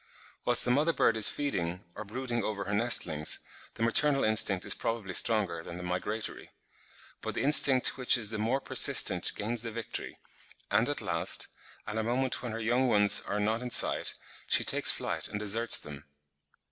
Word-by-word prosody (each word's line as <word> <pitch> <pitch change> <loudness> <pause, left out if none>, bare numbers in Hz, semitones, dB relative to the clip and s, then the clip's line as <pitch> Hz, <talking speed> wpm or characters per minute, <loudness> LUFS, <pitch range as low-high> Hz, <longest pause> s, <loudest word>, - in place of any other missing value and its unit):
Whilst 120 -1 +5
the 125 - 0
mother 150 +6 +1
bird 115 - +1
is 110 -2 +2
feeding, 90 -11 -4
or 110 - -8
brooding 120 +2 -5
over 105 -2 -4
her 100 - -5
nestlings, 90 -9 +1 0.4
the 115 - -4
maternal 135 +4 +3
instinct 110 -3 +2
is - - +1
probably 115 -5 -5
stronger 100 -6 +1
than 85 +1 -10
the 90 - -8
migratory; 90 +5 -5 0.7
but - - -6
the - - -3
instinct 135 -3 +4
which 130 0 +3
is 110 -3 -3
the 110 - -5
more 115 +5 -1
persistent - - +3
gains 115 +2 -3
the 115 - -6
victory, 115 -1 -7 0.6
and - - +1
at - - -3
last, - - -3 0.4
at 105 +1 -5
a - - -2
moment 125 +3 -2
when 125 -2 -6
her 110 - -6
young 120 +4 0
ones 105 -3 +4
are 105 - -3
not 110 +3 -1
in 125 - -6
sight, - - +1 0.3
she - - +3
takes - - +7
flight - - -2
and 105 - -6
deserts 110 +3 +3
them. 75 -1 -9
110 Hz, 185 wpm, -29 LUFS, 100-125 Hz, 0.7 s, takes